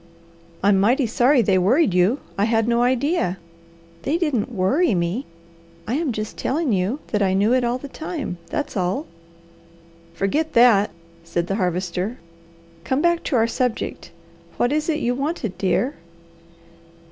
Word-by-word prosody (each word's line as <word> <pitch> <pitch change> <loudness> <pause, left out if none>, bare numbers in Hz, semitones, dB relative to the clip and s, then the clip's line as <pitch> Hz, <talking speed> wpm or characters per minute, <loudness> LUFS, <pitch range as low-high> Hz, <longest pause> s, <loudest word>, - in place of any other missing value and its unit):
"I'm 200 -1 +4
mighty 245 +7 +3
sorry 245 +3 +3
they 190 -2 +3
worried 240 - +3
you. 185 +10 +2
I 200 - +1
had 225 0 +1
no 235 0 +2
idea 255 - +1 0.3
" 170 0 -27
"They 295 +5 0
didn't 280 - -1
'worry,' 235 - +2
me! 175 +9 -2 0.6
I 225 - -1
am 300 0 0
just 215 -1 -5
telling 285 -2 0
you 200 +10 -1
that 210 - +1
I 190 -1 +2
knew 205 +5 +3
it 255 -1 +2
all 240 +1 0
the 285 - -8
time; 290 - -5
that's 295 -2 -3
all!" 190 - -1 1.1
"Forget 290 - -1
that!" 230 -4 +5 0.3
said 170 +1 -2
the 195 +3 -2
Harvester. 185 +3 -2 0.7
"Come 260 - 0
back 345 0 +3
to 275 - 0
our 225 -2 +4
subject. 245 0 -2 0.5
What 245 - +1
was 305 +2 0
it 310 -1 0
you 245 - +1
wanted, 275 - -3
dear?" 215 +8 +1
235 Hz, 160 wpm, -22 LUFS, 190-280 Hz, 1.1 s, that